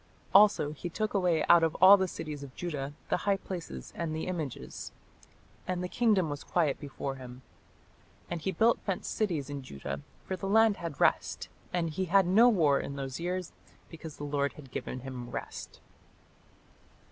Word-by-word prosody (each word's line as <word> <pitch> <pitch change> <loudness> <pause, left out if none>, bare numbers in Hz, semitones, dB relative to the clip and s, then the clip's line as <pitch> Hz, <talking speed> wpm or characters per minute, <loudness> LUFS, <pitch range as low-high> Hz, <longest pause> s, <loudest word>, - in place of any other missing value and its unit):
Also 195 -7 +6
he 170 +4 -6
took 215 +5 -2
away 180 -6 +2
out 170 -1 +6
of 165 -1 +1
all 190 +2 +9
the 190 -1 0
cities 150 -4 -6
of 140 -2 -10
Judah 145 -5 -4 0.2
the - - +2
high 200 -1 +1
places 170 - -7
and 165 -2 -3
the 160 - -3
images: 150 - -5 0.8
and 180 -1 -1
the - - -1
kingdom 210 -4 +2
was 145 -1 -5
quiet 155 -6 +1
before 135 -1 -5
him. 125 0 -10 0.8
And 175 -2 -4
he 190 - -1
built 225 +6 +3
fenced 195 -3 -3
cities 170 -11 -1
in 145 -1 -5
Judah: 70 - -6 0.2
for 190 - -2
the 195 +1 -4
land 220 0 +5
had 165 -4 -6
rest, - - +1 0.2
and 175 -2 0
he 165 +4 -2
had 190 +2 +4
no 215 +7 +6
war 155 -11 +3
in 140 - -5
those 135 0 -5
years; 180 +1 -3 0.4
because 160 -2 -9
the - - -7
Lord 140 -1 0
had 135 -4 -13
given 125 - -5
him 125 -2 -7
rest." - - -7
165 Hz, 180 wpm, -30 LUFS, 140-185 Hz, 0.8 s, all